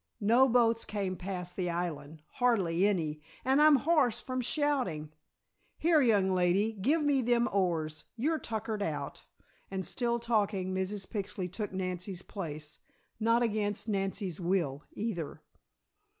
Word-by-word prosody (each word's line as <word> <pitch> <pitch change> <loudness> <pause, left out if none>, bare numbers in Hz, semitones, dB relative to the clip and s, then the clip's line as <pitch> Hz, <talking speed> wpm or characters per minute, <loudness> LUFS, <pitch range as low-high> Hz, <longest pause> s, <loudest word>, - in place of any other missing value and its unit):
No 235 +6 +5
boats 230 -1 +3
came 195 -3 -2
past 180 -1 -5
the 180 -2 -1
island 160 -3 -4
hardly 200 -8 +3
any, 155 -7 -1 0.2
and 265 +3 +4
I'm 305 -1 +8
hoarse 285 -4 +3
from 255 0 -3
shoutin'. 245 - -1 0.6
Here, 320 -2 +4
young 205 -7 +3
lady, 185 +4 +2
give 275 +11 +1
me 285 -2 +3
them 240 0 +2
oars. 165 -5 -1
You're 305 +7 0
tuckered 220 -1 -3
out," 160 -6 -3 0.5
and 190 -1 -3
still 235 -1 0
talking 205 -5 0
Mrs. 190 +1 -2
Pixley 195 -3 -4
took 205 +4 -4
Nancy's 185 0 -4
place, 155 -5 -6 0.4
not 230 +2 +3
against 210 -2 0
Nancy's 195 -3 -2
will, 170 -6 0
either. 175 -8 -4
200 Hz, 135 wpm, -31 LUFS, 180-235 Hz, 0.6 s, I'm